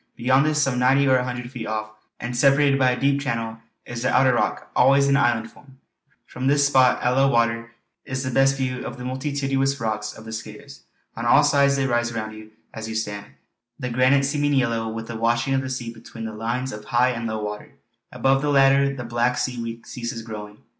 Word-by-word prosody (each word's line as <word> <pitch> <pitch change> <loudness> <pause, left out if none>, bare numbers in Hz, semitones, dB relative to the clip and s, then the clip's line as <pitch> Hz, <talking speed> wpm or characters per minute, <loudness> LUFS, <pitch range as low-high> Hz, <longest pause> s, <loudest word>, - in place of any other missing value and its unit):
Beyond 130 +4 +2
this, 155 0 +1
some 135 -4 +1
ninety 135 +2 +3
or 130 -1 +5
a 125 - 0
hundred 125 -1 -5
feet 120 -4 -6
off 110 0 -3 0.3
and 120 0 -5
separated 140 +2 +4
by 130 -1 +4
a 125 - -1
deep 140 0 +1
channel, 115 -4 -3 0.3
is 120 -1 -6
the 130 - +1
outer 130 -1 +4
rock, - - -1
always 135 +2 +5
in 140 - +3
island 120 -4 +1
form. 135 -2 -19 0.5
From 130 +1 -4
this 145 +1 +4
spot 130 -3 +3
at 125 - +2
low 135 +2 +3
water 115 -2 0 0.3
is 130 0 -4
the 130 - -3
best 135 +2 +3
view 130 -1 -3
of 120 - -7
the 125 - -7
multitudinous 135 +1 -1
rocks 110 -2 -3
of 110 - -12
the 110 - -8
Skares. 110 +6 -9 0.4
On 115 - -5
all 150 - +6
sides 140 -1 +3
they 135 -1 0
rise 120 -2 0
round 110 -1 -4
you 110 0 -12 0.2
as 110 0 -6
you 110 - -5
stand, 105 -2 -4 0.5
the 125 -3 -4
granite 130 +3 +3
seeming 145 +1 0
yellow 115 -3 0
with 115 0 -5
the 115 - -7
washing 115 +3 0
of 135 - +1
the 130 - -5
sea 120 -3 -5
between 115 0 -10
the 110 - -5
lines 120 +4 -3
of 105 0 -9
high 120 +3 +2
and 115 -1 -4
low 110 -1 -3
water; 105 +7 -6 0.4
above 135 +2 +1
the 145 - -1
latter 140 0 +4
the 125 - -6
black 120 +1 0
seaweed 115 -2 -4
ceases 120 -1 -6
growing. 105 -2 -8
125 Hz, 220 wpm, -23 LUFS, 115-135 Hz, 0.5 s, all